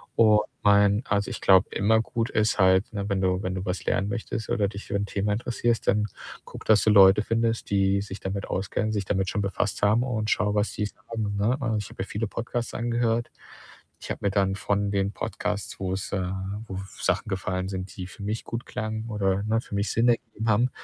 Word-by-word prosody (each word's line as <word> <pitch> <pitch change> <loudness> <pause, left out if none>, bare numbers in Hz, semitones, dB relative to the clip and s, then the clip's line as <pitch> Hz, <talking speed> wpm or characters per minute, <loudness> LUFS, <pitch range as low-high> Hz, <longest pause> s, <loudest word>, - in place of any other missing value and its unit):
und 105 -2 +6 0.2
mein 100 +2 +4
also, 100 0 0
ich - - -5
glaube, 95 0 +5
immer 110 +3 +3
gut, 115 +1 -2
ist 110 -3 +1
halt, 95 +1 +4
ne, 100 -1 -3
wenn 95 -1 0
du 95 0 +1
wenn 95 0 -2
du 95 +2 -4
was 90 0 -3
lernen 95 - +1
möchtest, 110 0 -4
oder 105 -3 +2
dich 100 +1 -8
für - - -4
'n 100 0 0
Thema 100 +1 -1
interessierst, 120 +1 -1
dann 105 0 +3 0.4
guck, - - -10
dass 110 -1 +5
du 110 - +3
Leute 100 0 +7
findest, 115 +1 0
die 100 0 +3
sich 100 0 -7
damit 95 +1 -3
auskennen, 100 +3 -1
sich 100 -3 -1
damit 95 -1 0
schon 105 - -1
befasst 100 +1 -1
haben 110 +4 +4
und 110 -4 -2
schau, 105 0 +1
was 105 +1 +1
die 105 - -1
sagen, 110 -2 -5
ne? 115 +6 +2
Äh, 110 -3 0
ich 105 - -4
habe - - -13
mir 95 - -1
viele 105 +2 -3
Podcasts 120 +2 -4
angehört. 120 0 0 0.7
Ich - - -9
habe - - -4
mir 100 - +2
dann 95 -1 +1
von 100 0 0
den 100 0 0
Podcasts, 100 +2 -3
wo 95 -1 -2
es, 95 +1 -4
äh 95 -2 -1 0.4
wo 95 - -5 0.2
Sachen - - 0
gefallen 95 -1 -2
sind, 95 0 -5
die 90 -2 -5
für 100 +2 -11
mich 105 +2 -3
gut 115 +1 -5
klangen, 110 +1 -4
oder 100 -2 0
ne, 110 +1 +1
für - - -7
mich 100 +1 0
Sinn 115 +2 +2
ergeben 115 -1 -1
haben, 115 +5 +3
105 Hz, 220 wpm, -26 LUFS, 95-110 Hz, 0.7 s, Leute